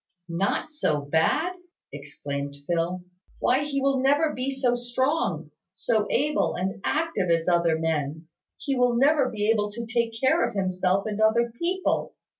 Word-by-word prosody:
"Not 195 - -1
so 155 - 0
bad!" 160 - +1 0.4
exclaimed 140 0 -6
Phil. 175 +2 -1 0.3
"Why, 255 - +2
he 285 -1 -2
will 275 -1 +2
never 290 +4 +2
be 255 +2 -2
so 265 -2 +1
strong 240 - -1 0.2
so 210 +3 0
able 300 +3 +1
and 190 +3 -3
active 310 - 0
as 165 0 +2
other 170 -2 +3
men. 160 -1 -2 0.3
He 275 -2 -2
will 250 -1 +2
never 275 +1 +3
be 210 -1 -2
able 210 -2 0
to 235 +1 -5
take 230 -1 -1
care 260 +1 +3
of - - -2
himself 185 0 0
and 215 0 -3
other 235 +2 +3
people. 350 +10 -1
220 Hz, 155 wpm, -25 LUFS, 170-265 Hz, 0.4 s, other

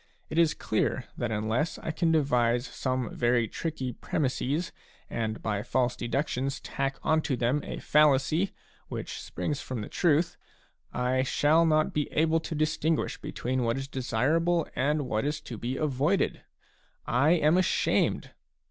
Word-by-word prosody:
It 160 - +1
is 165 -2 +4
clear 115 +4 -1
that 120 - -2
unless 110 +9 -1
I - - -4
can 165 +1 +1
devise 125 -6 +2
some 130 -4 -2
very 120 -1 +2
tricky 130 -1 -4
premisses 145 +5 -1 0.4
and 110 -1 -3
by 105 -2 -1
false 125 +2 0
deductions 135 +1 -2
tack 135 -1 -3
on 160 0 +3
to 135 -5 -1
them 125 +5 +1
a - - -5
fallacy 150 +5 +3 0.4
which - - -5
springs 145 -2 -3
from 125 -4 -4
the 105 - -5
truth, 165 0 +2 0.5
I 125 +1 +1
shall 155 +5 +3
not 155 -1 +2
be 150 -1 -1
able 160 +1 +3
to 160 - -5
distinguish 155 +1 0
between 130 +1 -2
what 115 +1 0
is 135 0 -4
desirable 150 +7 +1
and 145 +4 +1
what 110 0 0
is 150 +2 -1
to 120 - -7
be 120 +4 -3
avoided! 150 +5 +1 0.6
I 140 +7 +3
am 155 -1 +4
ashamed 185 0 +1
140 Hz, 150 wpm, -28 LUFS, 125-155 Hz, 0.6 s, is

